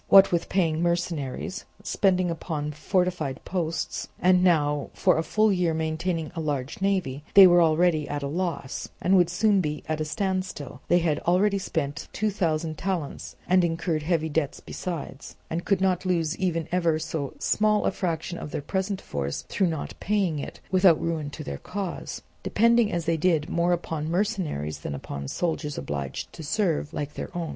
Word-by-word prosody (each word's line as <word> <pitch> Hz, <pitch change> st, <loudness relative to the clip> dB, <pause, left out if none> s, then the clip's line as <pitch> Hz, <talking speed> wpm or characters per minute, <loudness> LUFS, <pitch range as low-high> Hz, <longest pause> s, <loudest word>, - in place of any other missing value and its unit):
What 195 Hz, 0 st, +8 dB
with 170 Hz, -1 st, 0 dB
paying 165 Hz, -4 st, +1 dB
mercenaries, 170 Hz, 0 st, -2 dB, 0.2 s
spending 185 Hz, -3 st, +2 dB
upon 155 Hz, -2 st, -3 dB
fortified 180 Hz, -2 st, -1 dB
posts, 170 Hz, -3 st, -2 dB
and 180 Hz, 0 st, +4 dB
now 150 Hz, -5 st, +2 dB
for 180 Hz, -3 st, +3 dB
a -, -, +1 dB
full 215 Hz, +5 st, +2 dB
year 175 Hz, -3 st, +1 dB
maintaining 160 Hz, 0 st, -2 dB
a -, -, -3 dB
large 145 Hz, -1 st, -3 dB
navy, 185 Hz, -9 st, 0 dB
they 195 Hz, -1 st, +11 dB
were 175 Hz, -1 st, +7 dB
already 160 Hz, -1 st, +3 dB
at 145 Hz, 0 st, -3 dB
a -, -, -1 dB
loss 165 Hz, -3 st, -3 dB
and 190 Hz, -, +3 dB
would 175 Hz, -2 st, +5 dB
soon 195 Hz, +2 st, +3 dB
be 150 Hz, -2 st, -3 dB
at 155 Hz, 0 st, -1 dB
a -, -, 0 dB
standstill: 185 Hz, -6 st, -3 dB
they 175 Hz, -, +5 dB
had 160 Hz, -3 st, +1 dB
already 195 Hz, +3 st, +2 dB
spent 150 Hz, -6 st, -3 dB
two 215 Hz, 0 st, 0 dB
thousand 160 Hz, -5 st, -1 dB
talents 175 Hz, -6 st, -3 dB
and 185 Hz, 0 st, +4 dB
incurred 165 Hz, -1 st, 0 dB
heavy 160 Hz, 0 st, 0 dB
debts 150 Hz, -2 st, -1 dB
besides, 160 Hz, -5 st, -6 dB, 0.2 s
and 170 Hz, +2 st, -2 dB
could 195 Hz, -2 st, +2 dB
not 185 Hz, -2 st, +2 dB
lose 170 Hz, -3 st, 0 dB
even 170 Hz, -4 st, 0 dB
ever 170 Hz, -3 st, +2 dB
so 155 Hz, -3 st, -4 dB
small 210 Hz, 0 st, +2 dB
a -, -, +3 dB
fraction 170 Hz, 0 st, -3 dB
of -, -, -6 dB
their 145 Hz, -, -4 dB
present 190 Hz, +4 st, -2 dB
force 70 Hz, 0 st, -3 dB
through 195 Hz, -, +2 dB
not 160 Hz, -3 st, -3 dB
paying 195 Hz, -7 st, 0 dB
it, -, -, -7 dB
without 185 Hz, -4 st, +5 dB
ruin 160 Hz, -3 st, -2 dB
to -, -, -7 dB
their 70 Hz, -1 st, -5 dB
cause; 195 Hz, -3 st, -5 dB, 0.2 s
depending 235 Hz, 0 st, +3 dB
as 170 Hz, -2 st, -2 dB
they 165 Hz, 0 st, +1 dB
did 160 Hz, -2 st, +1 dB
more 170 Hz, +1 st, +2 dB
upon 160 Hz, -3 st, -2 dB
mercenaries 170 Hz, -, -1 dB
than 70 Hz, -, -4 dB
upon 70 Hz, 0 st, -6 dB
soldiers 160 Hz, -, -2 dB
obliged 70 Hz, -2 st, -4 dB
to -, -, -9 dB
serve, 160 Hz, -1 st, 0 dB
like 150 Hz, -2 st, -4 dB
their -, -, -5 dB
own. 165 Hz, -2 st, -2 dB
170 Hz, 180 wpm, -26 LUFS, 150-185 Hz, 0.2 s, they